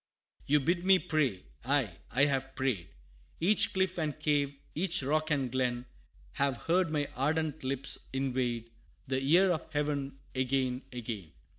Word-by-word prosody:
XV. - - -31
"You 150 - +6
bid 170 +5 +1
me 190 0 +7
pray? 140 - 0 0.2
aye, 125 -9 +1
I 135 +4 +4
have 135 -1 -1
prayed! 115 -12 -1 0.5
Each 190 +5 +4
cliff 190 -1 0
and 155 -2 -2
cave, 145 -2 +1 0.2
each 175 -1 0
rock 155 +3 +1
and 135 -5 0
glen, 125 -1 0 0.5
Have 140 -2 0
heard 175 +1 +2
my 150 -2 0
ardent 155 +3 0
lips 135 +1 -2
invade 125 -3 -1 0.3
The 130 -1 -1
ear 175 +7 +5
of 160 -1 -3
Heaven, 145 -2 -1 0.2
again, 130 -1 0
again. 110 - -6
140 Hz, 150 wpm, -31 LUFS, 130-155 Hz, 0.5 s, me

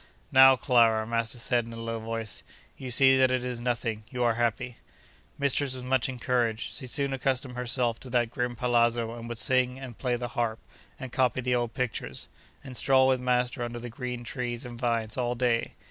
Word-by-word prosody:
'Now, 135 0 +8
Clara,' 115 -4 +3
master 115 +1 -2
said, 120 0 0
in 115 - -9
a 115 - -8
low 115 0 -4
voice, 115 -1 -4 0.3
'you 130 - -7
see 130 +1 +5
that 130 -1 +5
it 130 -1 0
is 125 -2 -4
nothing? 120 -3 -2
You 125 -1 -2
are 120 -1 +3
happy.' 120 +1 -1 0.6
Mistress 140 -1 +1
was 130 - -6
much 130 0 +1
encouraged. 120 -3 -1
She 130 - -6
soon 140 +1 0
accustomed 130 -1 -1
herself 120 -1 -1
to 130 - -10
that 120 -2 +1
grim 125 -1 -2
palazzo, 120 -1 +1
and 115 0 -8
would 120 - -4
sing, 130 +1 +2
and 130 -3 -8
play 125 -2 0
the 120 0 -4
harp, 120 -3 -1 0.4
and 130 -2 -7
copy 130 0 +1
the 125 0 0
old 120 -1 -1
pictures, 125 -3 -2 0.3
and 130 -2 -9
stroll 130 +2 +4
with 130 -1 +3
master 125 -1 0
under 120 0 -4
the 120 +1 -7
green 125 +1 -5
trees 120 -1 -4
and 120 -1 -8
vines 115 -2 -1
all 120 -1 0
day. 120 -1 0
125 Hz, 200 wpm, -28 LUFS, 115-130 Hz, 0.6 s, Now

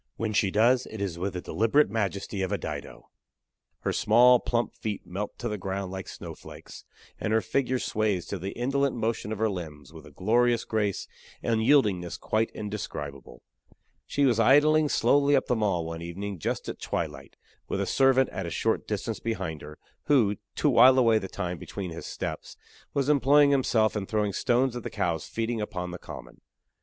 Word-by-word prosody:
When 115 -1 -2
she 100 -1 +2
does, 120 +5 +3
it 110 - -8
is 95 -4 -3
with 95 +1 -2
the 90 - -4
deliberate 115 +11 +2
majesty 100 -2 -2
of 95 +1 -2
a 100 - +1
Dido. - - -7 0.7
Her - - -1
small, 120 +3 +5
plump 120 0 -1
feet 105 -2 -5
melt 100 +4 -5
to 120 - -4
the 105 -2 -3
ground 95 0 -4
like 95 -1 -6
snowflakes; - - -10 0.3
and 105 - -2
her 110 - +4
figure 130 +2 0
sways 105 -6 -1
to 100 - -5
the 95 +3 -4
indolent 140 +3 0
motion 110 -2 -2
of 110 - -3
her 110 +2 +1
limbs 80 -6 -7
with 80 -1 -12
a - - -14
glorious 120 - +2
grace 105 -3 -1 0.4
and 115 -1 +1
yieldingness 105 -9 +2
quite 110 +1 0
indescribable. 75 - -6 0.6
She 140 - +1
was 120 -4 +3
idling 145 +5 +5
slowly 145 0 +3
up 135 - +2
the 125 - +1
Mall 100 -7 0
one 80 0 -6
evening 95 +3 -5
just - - -3
at - - -6
twilight, - - -4 0.3
with - - -2
a - - 0
servant 135 -1 +4
at 95 -4 -5
a - - -3
short 80 - -1
distance - - -3
behind 80 -9 -4
her, 75 +1 -10 0.3
who, 110 -9 +3 0.2
to - - +1
while 130 -1 +7
away 115 -3 +4
the 95 - -6
time 90 -3 -4
between 95 -4 -6
his 80 - -7
steps, - - -6 0.4
was 140 -1 +1
employing 145 0 +5
himself 115 -6 +2
in 100 -2 -3
throwing 105 -2 0
stones 125 +3 +1
at 120 - -4
the - - -5
cows 85 -3 -2
feeding 115 0 -2
upon 90 -4 -4
the 90 - -7
Common. - - -11
110 Hz, 190 wpm, -27 LUFS, 95-125 Hz, 0.7 s, while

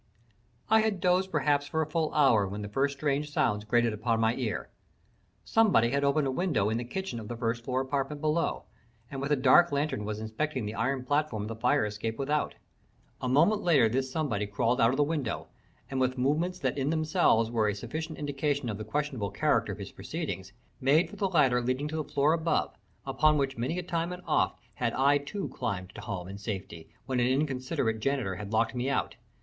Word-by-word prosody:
I 220 +1 +5
had 215 -3 +1
dozed 185 +1 +2
perhaps 145 -5 +1
for 160 +1 0
a - - -3
full 155 0 -1
hour 125 -9 +4
when 100 +2 -5
the - - -4
first 140 +6 0
strange 145 +1 0
sounds 105 -6 +1
grated 120 0 +2
upon 115 +2 0
my 110 0 +3
ear. 120 -4 -3 0.7
Somebody 195 - +4
had 140 +1 +1
opened 140 +1 +2
a 135 - 0
window 130 - +1
in 115 - 0
the - - -3
kitchen 130 0 -4
of 110 - -8
the 120 - -5
first 115 0 -2
floor 130 +1 0
apartment 140 +2 -2
below, 155 +2 0 0.5
and 135 -1 -5
with 140 +1 -2
a - - +5
dark 140 +6 +5
lantern 145 -6 -1
was 105 0 -4
inspecting 115 +4 -3
the 105 - -4
iron 130 +3 -1
platform 145 -6 0
of 105 - -5
the 115 - -4
fire 125 +2 +2
escape 105 +2 -4
without. 145 +2 -1 0.7
A 130 - -1
moment 165 +11 +4
later 145 -10 +4
this 130 +4 -1
somebody 130 -10 -1
crawled 115 +5 +1
out 115 - +6
of 130 - -1
the 145 - +4
window, 145 -6 -3 0.4
and 135 - -3
with 130 0 +1
movements 155 +8 +1
that 170 - -1
in 135 +2 0
themselves 155 -8 +2
were 110 -3 +2
a 105 - 0
sufficient 155 +9 -5
indication 145 -2 -1
of 105 -1 -4
the - - -4
questionable 140 -7 -2
character 115 -1 +1
of 100 - -6
his 100 -2 -7
proceedings, 95 - -5 0.3
made 145 +6 +3
for - - -9
the 195 -2 0
ladder 135 -8 +3
leading 130 +4 -1
to 155 - -3
the 155 - -1
floor 145 +3 +3
above, 165 0 0 0.3
upon 145 +3 +3
which 135 -1 0
many 125 +9 -2
a 180 - -2
time 170 0 -2
and 180 0 -7
oft - - +1 0.2
had - - -1
I 140 +2 +4
too 165 +8 -5
climbed 95 -3 -4
to - - -8
home 95 -5 -5
and 100 +1 -8
safety 95 -6 -6 0.2
when 130 0 -1
an 120 - +3
inconsiderate 130 -4 0
janitor 120 -7 -1
had 105 -1 -7
locked 115 +2 +1
me 125 +2 -1
out. 140 - -1
135 Hz, 215 wpm, -29 LUFS, 115-150 Hz, 0.7 s, out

